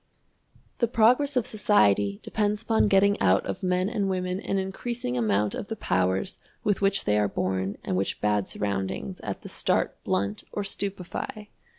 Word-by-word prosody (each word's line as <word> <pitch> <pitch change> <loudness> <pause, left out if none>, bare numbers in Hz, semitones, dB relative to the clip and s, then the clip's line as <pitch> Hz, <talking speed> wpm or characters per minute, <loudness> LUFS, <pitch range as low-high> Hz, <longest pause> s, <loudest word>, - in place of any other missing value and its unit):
The 235 - +3
progress 250 +5 +3
of 245 - +2
society 100 - +2
depends 210 0 -1
upon 225 -1 +3
getting 200 0 +4
out 95 0 +3
of 95 - -4
men 180 0 +1
and 200 -2 -1
women 185 0 -1
an 195 -1 -2
increasing 190 - -3
amount 105 -3 +1
of - - -5
the 225 - -4
powers 95 - 0 0.2
with 205 -1 +1
which 195 0 +2
they 105 0 +3
are 105 - +2
born 95 0 -2
and - - -2
which 95 +1 -1
bad 105 -2 +1
surroundings 100 - -3
at 100 -2 -5
the - - -8
start - - 0
blunt 100 +3 -1
or 205 - -2
stupefy. 200 +2 -4
185 Hz, 170 wpm, -26 LUFS, -, 0.2 s, getting